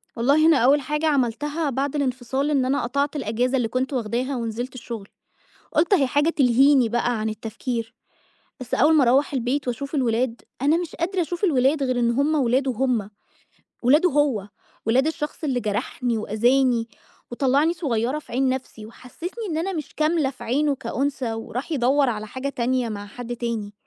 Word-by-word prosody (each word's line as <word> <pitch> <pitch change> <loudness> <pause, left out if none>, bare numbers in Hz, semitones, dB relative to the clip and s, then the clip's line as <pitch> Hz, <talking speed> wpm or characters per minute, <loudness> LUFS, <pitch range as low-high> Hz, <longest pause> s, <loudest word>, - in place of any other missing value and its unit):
والله 280 +7 +3
أنا 325 -2 +6
أوّل 270 +4 +4
حاجة 300 +4 -2
عملتها 290 +2 0
بعد 275 +2 -2
الانفصال 265 +1 -1
إن 270 -3 +2
أنا 270 +2 0
قطعت 280 +5 -1
الأجازة 250 0 0
اللي 245 -3 0
كنت 255 +4 -2
واخداها 250 +3 -1
ونزلت 240 +2 -4
الشغل، 230 -4 -7 0.7
قُلت 335 +5 +2
أهي 310 -9 +5
حاجة 290 +5 +2
تلهيني 265 -2 +4
بقى 240 0 0
عن 220 - -1
التفكير، 225 +2 -4 0.7
بس 255 - -3
أوّل 315 +2 +4
ما 305 - +5
أروّح 265 +5 +3
البيت 260 +1 -1
وأشوف 275 +5 -4
الولاد، 245 -2 0 0.2
أنا 295 +4 +4
مش 340 -2 -4
قادرة 365 +3 -1
أشوف 350 +3 -2
الولاد 280 -3 +2
غير 255 -2 0
إن 235 -1 +2
هُم 280 +6 +1
ولاده 265 -1 +2
هُم 235 -4 0 0.7
ولاده 300 +9 +4
هو، 270 -9 +1 0.4
ولاد 255 +5 +3
الشخص 315 0 -4
اللي 260 -4 0
جرحني 225 +2 -2
وأذاني، 240 +2 +2 0.4
وطلعني 275 +6 +2
صغيّرة 265 -5 -1
في 305 - -13
عين 265 +2 +1
نفْسي، 255 -4 -4
وحسّسني 345 - -8
إن 315 - -1
أنا 375 +4 -1
مش 305 -5 -6
كاملة 310 -2 +1
في 260 - -11
عينه 285 +4 +1
كأنثى، 265 0 -2
وراح 230 +7 -5
يدوّر 275 0 +3
على 215 -2 -3
حاجة 260 +5 -4
تانية 255 -2 0
مع 205 -2 -6
حد 240 +3 -7
تاني، 230 -4 -3
260 Hz, 170 wpm, -23 LUFS, 235-290 Hz, 0.7 s, أنا